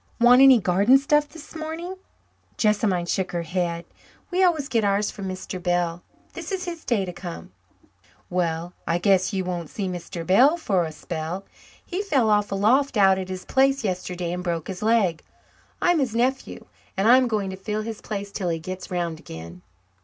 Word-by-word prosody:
"Want 245 +2 +7
any 265 -3 +8
garden 200 +7 +4
stuff 295 +2 +2
this 325 0 -13
morning?" 325 +4 -5 0.6
Jessamine 205 -5 +1
shook 185 +1 -2
her 170 -1 -1
head. 170 0 -2 0.5
"We 370 +1 +2
always 320 -6 +2
get 230 -5 +1
ours 200 +1 +1
from 195 -2 -7
Mr. 185 0 -6
Bell. 175 -1 0 0.3
This - - -7
is 375 -1 -2
his 335 -2 -6
day 210 -6 0
to 180 - -6
come." 175 -1 -8 0.8
"Well, 175 -1 -2
I 170 - +2
guess 185 +1 +2
you 190 -2 -2
won't 175 -3 -4
see 200 -3 -4
Mr. 175 -2 -6
Bell 260 - +5
for 195 - 0
a 160 - -5
spell. 160 +4 -5 0.4
He 365 +3 -3
fell 270 - +2
off 205 -1 +2
a - - 0
loft 250 +6 +2
out 190 -1 +5
at 185 0 -5
his 185 -1 -6
place 270 0 +2
yesterday 180 -3 -3
and 180 0 -4
broke 170 -2 -3
his 185 -2 -6
leg. 210 -7 +2 0.6
I'm 350 -2 +4
his 250 -5 -1
nephew, 255 +3 -1 0.3
and 195 +3 +2
I'm 255 +2 +6
going 210 -4 -1
to - - -5
fill 210 +3 -3
his 225 -1 -6
place 200 -1 -5
till 185 -3 -2
he 165 - -1
gets 185 +3 -7
'round 170 -3 -2
again." 85 - -10
195 Hz, 190 wpm, -24 LUFS, 175-250 Hz, 0.8 s, any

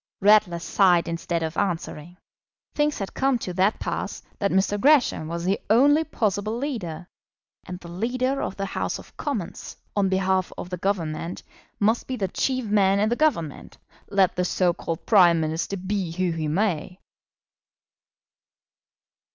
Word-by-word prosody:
Ratler 205 -3 +5
sighed 175 0 +3
instead 170 0 -2
of 160 0 -3
answering. 175 -3 -3 0.6
Things 295 0 +1
had 195 - -5
come 270 -1 +1
to 185 -6 -5
that 190 +4 +2
pass - - -4 0.2
that 200 - +1
Mr. 195 +2 +1
Gresham 275 - +4
was 170 +1 -4
the 195 +2 +1
only 285 +8 +5
possible 215 -6 -1
leader. 210 - -4 0.6
And 180 0 -6
the 175 - -12
leader 255 +9 -1
of - - -4
the 195 - -2
House 195 - -3
of - - -15
Commons, 225 - -5 0.2
on 200 -2 +2
behalf 190 -1 +1
of 180 - -7
the 180 - -3
Government, 170 -3 -2 0.4
must 220 +3 +1
be 260 - -2
the 200 -5 -1
chief 255 +5 -1
man 200 -2 +3
in 210 +1 +2
the 240 - +1
Government, 205 - -1 0.3
let 195 -2 +3
the 180 - 0
so 180 0 +1
called 165 -1 -5
Prime 175 -6 +6
Minister 160 +5 -2
be 190 -1 -2
who 180 0 0
he 160 -2 -2
may. 180 +1 -1
190 Hz, 155 wpm, -24 LUFS, 175-215 Hz, 0.6 s, Prime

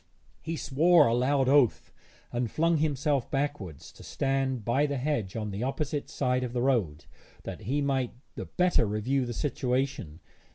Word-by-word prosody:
He 165 0 -4
swore 155 +2 +4
a 115 - +2
loud 130 +2 +2
oath, 135 -4 +3 0.4
and 120 -1 -1
flung 165 +5 +2
himself 145 -3 0
backwards 135 - -3
to - - -16
stand 135 -4 -1
by 135 +5 +2
the 140 -1 -2
hedge 125 -8 -2
on 105 -2 -3
the 100 +2 -5
opposite 140 +3 -2
side 125 0 0
of 120 -1 -4
the 120 - -1
road, 95 - 0 0.4
that - - -7
he 145 +2 +1
might 135 -3 -1 0.2
the - - -6
better 180 -10 +2
review 120 +6 0
the 120 - -4
situation. 125 - -2
135 Hz, 165 wpm, -28 LUFS, 120-145 Hz, 0.4 s, swore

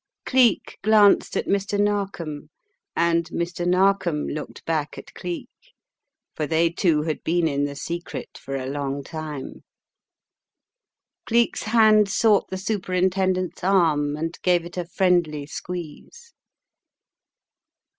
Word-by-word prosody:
Cleek 255 -5 +2
glanced 210 -1 +4
at - - -1
Mr. 200 +1 0
Narkom 190 -8 -2 0.5
and 170 0 +2
Mr. 175 +1 -3
Narkom 185 -4 +2
looked 150 0 -6
back 155 -2 -2
at - - -11
Cleek, 175 -2 -5 0.9
for 150 - -2
they 165 +1 +2
two 165 -4 +1
had 155 -1 -3
been 170 0 +1
in 140 -1 0
the 140 0 -5
secret 170 +4 -6
for 135 - -6
a 130 -1 -3
long 140 0 -3
time. 155 -2 -7 1.6
Cleek's 235 0 +2
hand 215 -2 +5
sought 210 0 +3
the 190 - -4
Superintendent's 185 -2 -1
arm 160 -6 +2
and 165 +2 -4
gave 175 -2 +2
it 175 - -10
a 180 -1 -3
friendly 170 -5 +1
squeeze. 180 - -8
175 Hz, 120 wpm, -23 LUFS, 155-195 Hz, 1.6 s, hand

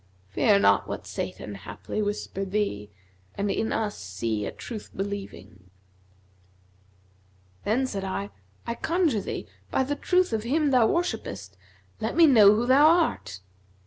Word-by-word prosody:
Fear 200 - +3
not 200 - +3
what - - -5
Satan - - -5
haply 215 - -6
whispered 205 -2 -3
thee, 185 - -2 0.2
* 95 +1 -34
And 200 0 -1
in 220 - -1
us 215 -2 -2
see 105 +2 -3
a - - -4
Truth 220 -4 -8
believing 195 - -6 2.0
Then 240 +6 +1
said 200 -6 -4
I, 105 - -4 0.3
'I 235 - -3
conjure 330 - +1
thee, - - -5 0.2
by 265 - +1
the 290 +2 -2
truth 360 -1 +1
of 220 - 0
Him 285 +5 +1
thou 245 -4 +5
wore 345 +7 +2
shippest, 100 - -6 0.5
let 220 - -2
me 335 0 +7
know 215 -8 +7
who 230 +3 0
thou 270 +4 +6
art!' 105 - +1
210 Hz, 150 wpm, -26 LUFS, 185-265 Hz, 2.0 s, me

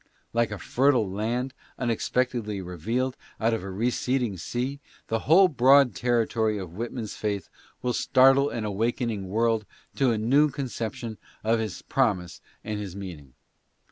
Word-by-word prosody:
'"' - - -40
Like 115 -2 +2
a 105 - -5
fertile 125 +2 +2
land 115 +7 -2 0.2
unexpectedly 120 -3 -1
revealed 110 +9 -2 0.2
out 115 +1 +2
of 115 - -1
a 95 - -5
receding 120 +2 0
sea, 125 - -3 0.3
the 115 - +1
whole 185 +4 +8
broad 135 -2 +5
territory 115 -3 +1
of 90 -4 -7
Whitman's 115 +1 -5
faith 100 -2 -3 0.3
will 125 -1 0
startle 135 +3 +5
an 115 -2 -3
awakening 110 0 -1
world 110 +1 +1 0.3
to 135 -2 +3
a 115 - 0
new 135 +8 +4
conception 115 -4 -5 0.2
of 115 +1 +2
his 110 -5 -4
promise 95 -10 0 0.2
and 105 -1 -3
his 100 -3 -6
meaning. 80 -10 -9
115 Hz, 145 wpm, -26 LUFS, 105-125 Hz, 0.3 s, whole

